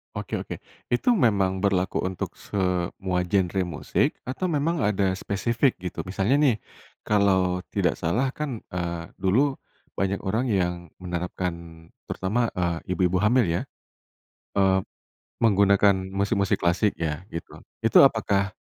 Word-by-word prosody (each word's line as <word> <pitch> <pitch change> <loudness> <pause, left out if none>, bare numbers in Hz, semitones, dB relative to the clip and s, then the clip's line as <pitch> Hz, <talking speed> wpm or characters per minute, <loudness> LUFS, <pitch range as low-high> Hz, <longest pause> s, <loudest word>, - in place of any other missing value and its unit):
Oke - - -6
oke. - - -6 0.4
Itu 235 - +3
memang 100 - +2
berlaku 95 -2 +1
untuk 95 -1 -4
semua 90 -1 -1
genre 95 0 +1
musik 85 -4 -1
atau 135 +8 -3
memang 150 0 0
ada 95 -2 +1
spesifik 115 +7 0
gitu? 90 -1 -5
Misalnya 95 +7 +1
nih, 145 -6 +4 0.5
kalau 95 -3 +2
tidak 95 -3 +1
salah 115 +12 0
kan, 140 -7 -3 0.2
eee, 85 -1 -3
dulu 125 +9 +2 0.4
banyak 95 +1 0
orang 110 +6 -1
yang 90 -3 +1 0.2
menerapkan, 90 0 -3 0.6
terutama, 110 +5 0
eee, 85 -1 -2
ibu-ibu 90 +1 +1
hamil, 120 -1 +4
ya, 85 +1 0 0.9
eee, 95 -1 +4 0.6
menggunakan 100 -2 +4 0.2
musik-musik 100 0 +1
klasik 90 +4 +2
ya, 80 +4 -3
gitu. 85 - -8 0.2
Itu - - +6
apakah, 100 +1 +3
95 Hz, 125 wpm, -25 LUFS, 90-105 Hz, 0.9 s, Itu